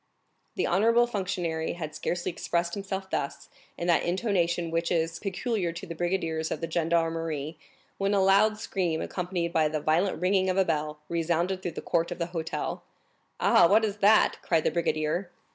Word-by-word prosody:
The - - 0
honorable 230 +6 +4
functionary 180 -7 -2
had 155 -3 -6
scarcely 175 +3 -2
expressed 170 0 -1
himself 195 -1 -4
thus, 140 - -3 0.3
in 170 - -3
that 175 -1 +3
intonation 175 -3 0
which 165 0 -1
is 165 -1 0
peculiar 195 -2 -2
to 170 +4 -7
brigadiers 165 -2 -1
of - - -3
the 165 - -3
gendarmerie, 165 -2 -1 0.4
when 200 +1 +1
a - - +3
loud 205 +3 +4
scream, 180 -6 -1
accompanied 175 -2 -3
by 160 -2 +3
the 155 0 -2
violent 165 +6 +1
ringing 190 +1 +2
of 185 - 0
a 190 - +4
bell, 150 -2 -1
resounded 170 +3 0
through 175 - -4
the - - -6
court 170 -1 0
of - - -5
the 170 - -1
hotel. 165 -1 -3 0.6
"Ah, - - +6
what 215 +4 +4
is 205 -1 -3
that?" 210 +2 +4
cried 165 -3 +1
the - - +1
brigadier. 160 +2 -1
175 Hz, 175 wpm, -28 LUFS, 165-190 Hz, 0.6 s, Ah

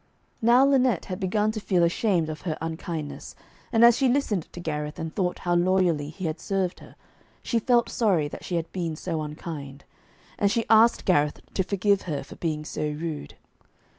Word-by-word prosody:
Now 240 +4 +6
Lynette 260 -8 +2
had 185 0 -5
begun 210 +2 +1
to 215 - -4
feel 185 -4 +1
ashamed 175 -1 +1
of 155 -1 -6
her 160 -4 -3
unkindness, 160 -1 -5 0.4
and 235 -1 +6
as 235 -1 +7
she 265 -2 +3
listened 235 - 0
to - - -9
Gareth, 150 -2 -4
and 160 -1 -5
thought 180 -2 -1
how 175 - -1
loyally 175 -4 +2
he 180 +4 -7
had 160 0 -2
served 190 -2 -2
her, - - -15 0.5
she 235 - 0
felt 240 +1 +3
sorry 185 -10 +1
that - - -9
she 180 - -3
had 165 -1 -2
been 170 -4 -3
so 165 0 -3
unkind. 150 -2 -7 0.6
And 200 -1 +3
she 230 0 0
asked 225 +1 +5
Gareth 150 -5 +2
to - - +1
forgive 200 +1 +1
her 145 -3 -2
for - - -12
being 155 -2 -2
so - - -5
rude. 150 - -4
175 Hz, 190 wpm, -26 LUFS, 155-210 Hz, 0.6 s, as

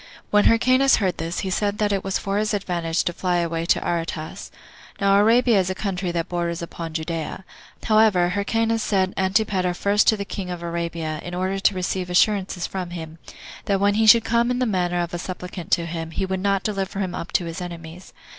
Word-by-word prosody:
When 210 0 +4
Hyrcanus 255 +4 +5
heard 190 -4 0
this, 165 +1 -3
he 190 - -3
said 205 +1 0
that 210 -1 +1
it 195 -1 0
was 195 -1 -1
for 200 +1 -2
his 215 0 0
advantage 175 -4 -1
to 175 - -2
fly 180 +1 -1
away 170 -1 -1
to - - +2
Aretas. 165 -2 -4 0.5
Now 200 -1 +4
Arabia 230 +1 +4
is 185 -1 0
a 185 - -2
country 185 -3 -2
that 170 -1 -2
borders 170 -1 -2
upon 165 -1 -7
Judea. 165 +3 -4 0.4
However, 215 -5 +4
Hyrcanus 225 +4 0
sent 190 -3 +1
Antipater 190 -2 +1
first 200 +3 +2
to 220 - +5
the 200 - -4
king 195 -2 -5
of 175 -1 -5
Arabia, 170 -2 -3
in 175 0 -6
order 190 +2 -1
to 195 0 +2
receive 185 0 -2
assurances 185 -1 +2
from 185 -2 -4
him, 165 -2 -8 0.5
that 195 -1 +1
when 200 +1 +3
he 220 +1 +2
should 225 +1 +7
come 235 +1 +2
in 250 - 0
the 255 - +1
manner 180 -5 0
of 170 - -6
a 175 - -3
supplicant 180 -1 -7
to 170 - +2
him, 165 -1 -5
he 190 +4 -2
would 190 0 -2
not 195 0 +1
deliver 195 -2 -3
him 190 -3 -2
up 180 -1 -6
to 175 - +2
his 165 +2 -6
enemies. 170 0 -8
185 Hz, 210 wpm, -23 LUFS, 170-205 Hz, 0.5 s, should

